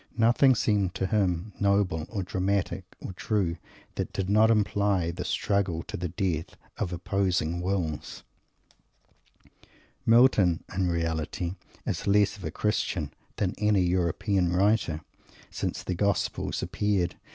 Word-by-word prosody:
Nothing 120 +3 +5
seemed 100 -5 +1
to - - -1
him 95 -1 0
noble, 100 -6 +1
or 100 -4 -3
dramatic, 95 +1 -1
or - - -7
"true," 90 -3 -1 0.4
that - - -3
did 95 0 -2
not 110 +2 +5
imply 100 -5 +2
the 85 - -5
struggle 95 -5 0
to - - -7
the 90 - -2
death 80 -2 -2 0.2
of 95 -4 -1
opposing 90 -2 0
wills. 90 -5 -3 1.8
Milton, 115 -8 +5
in 95 -1 +1
reality, 85 +1 -2 0.3
is - - -3
less 100 0 +4
of 100 - -12
a - - -2
Christian 95 -7 -1 0.2
than 95 -3 -1
any 105 -2 +3
European 90 +1 +1
writer, 90 -4 +2 0.5
since - - -3
the 90 - -2
Gospel 100 +2 0
appeared. 95 -2 0
95 Hz, 130 wpm, -27 LUFS, 85-105 Hz, 1.8 s, Nothing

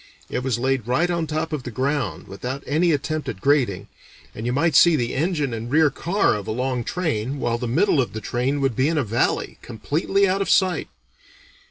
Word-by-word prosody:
It - - -1
was 130 -3 0
laid 130 -1 -1
right 160 +9 +1
on 170 -2 -1
top 155 +1 -2
of 150 - -2
the 125 - -7
ground, 130 - -2
without 125 +8 -5
any 165 +4 +2
attempt 150 0 -2
at 105 -7 -6
grading, 125 -6 +1 0.5
and 110 +2 -5
you - - 0
might 155 +5 +1
see 170 +2 +7
the 120 -4 -1
engine 150 -3 0
and 115 +1 -5
rear 155 +1 +4
car 175 +8 +1
of 105 -2 -5
a - - -2
long 125 +1 -1
train, 140 -5 -2
while 120 -3 -1
the 125 - -3
middle 150 - +3
of 125 - -4
the 110 - -4
train 130 +5 -1
would 135 -4 +1
be 130 +5 +2
in 165 - 0
a 145 - +2
valley, 115 +1 -1
completely 170 - 0
out 190 +1 0
of 195 - -1
sight. 185 -4 +2
135 Hz, 215 wpm, -23 LUFS, 120-160 Hz, 0.5 s, see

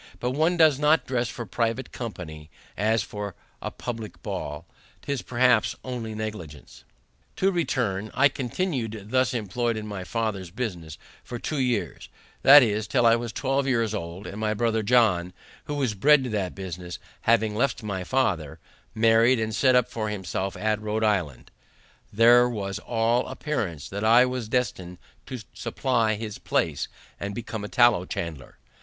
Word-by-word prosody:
But 125 - -1
one 160 +6 +1
does 155 -4 +5
not 150 -2 +3
dress 125 -3 -1
for 120 - -6
private 115 +4 -2
company 80 -10 -7 0.3
as 110 +2 +1
for 105 -3 -6 0.3
a - - -3
publick 115 -3 -7
ball. 75 +3 -5 0.4
'Tis 140 -3 -2
perhaps 125 -2 +2
only 120 -4 -5
negligence. 90 - -7 0.5
To 195 +1 +2
return: 115 - -1
I 140 +2 +6
continued 125 - -3
thus 130 0 +2
employed 115 +2 -1
in 110 - -5
my 100 -3 -5
father's 105 -3 -3
business 85 -7 -5 0.3
for 120 - -6
two 150 +5 -3
years, 125 -5 -1 0.3
that 145 +1 +9
is, 110 -1 0
till 120 +2 +2
I 115 0 +6
was 120 -1 -3
twelve 135 +2 0
years 115 -4 +1
old; 90 -1 -5
and 105 - -7
my 110 0 0
brother 115 0 +1
John, 105 -6 +3 0.3
who 145 - -4
was 135 -6 0
bred 140 +7 +5
to 125 - -3
that 100 -4 -2
business, 90 -2 -6 0.3
having 110 -2 +3
left 125 +2 0
my 100 -3 -3
father, 90 - 0 0.4
married, 115 +2 +4
and 110 0 -2
set 125 +5 +4
up 125 -1 +4
for 110 -2 -3
himself 95 -1 -3
at 110 0 0
Rhode 110 +1 -2
Island, 95 - -1 0.6
there 120 +3 +6
was 100 -4 -4
all 115 +1 +1
appearance 105 - -3
that 100 +2 -4
I 115 +3 +6
was 125 -3 -4
destined 100 -8 -2 0.3
to 130 -3 -6
supply 115 -5 0
his 105 -1 -6
place, 75 -4 -1 0.3
and 100 0 -4
become 110 -2 -5
a 105 - -5
tallow 120 -7 +4
chandler. 75 -6 -6
110 Hz, 160 wpm, -26 LUFS, 100-125 Hz, 0.6 s, that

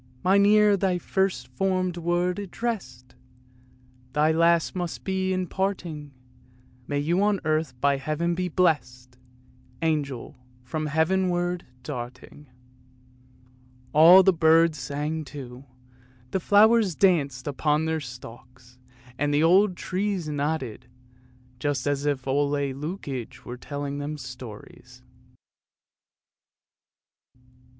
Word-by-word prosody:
" 125 - -29
Mine 200 +2 +4
ear 210 -1 +5
thy 190 -2 0
first 190 -8 -1
formed 185 +5 -1
word 175 +2 -1
addressed, 190 - -5 1.0
Thy 150 +1 +3
last 170 +2 +2
must 175 -2 -4
be 190 -1 -1
in 185 0 -1
parting; 175 -6 -3 0.8
May 145 - -2
you 165 +6 +1
on 205 -1 +2
earth 155 -5 -1
by 140 +1 +2
Heaven 155 +5 -1
be 180 +1 -2
blessed, 130 -8 -1 0.6
Angel, 145 -6 -2 0.3
from 155 +5 -3
Heavenward 175 +2 0 0.2
darting! 130 +2 -8 0.7
" 125 0 -30
All 170 +5 +8
the 190 0 +4
birds 165 -1 +4
sang 150 +4 -3
too, 135 -2 -10 0.7
the 190 - 0
flowers 210 0 +4
danced 140 -9 +2
upon 150 +2 0
their 160 0 -1
stalks, 125 -1 -12 0.4
and 145 +1 +1
the 145 +2 +2
old 185 +2 +4
trees 190 -2 -2
nodded, 145 -5 -3 0.7
just 145 -2 -1
as 145 0 -1
if 135 -2 -2
Ole 140 +2 +1
Lukoie 140 - -4
were 120 - -6
telling 145 +2 -5
them 150 +1 -4
stories. 125 -1 -11
155 Hz, 110 wpm, -25 LUFS, 135-180 Hz, 1.0 s, All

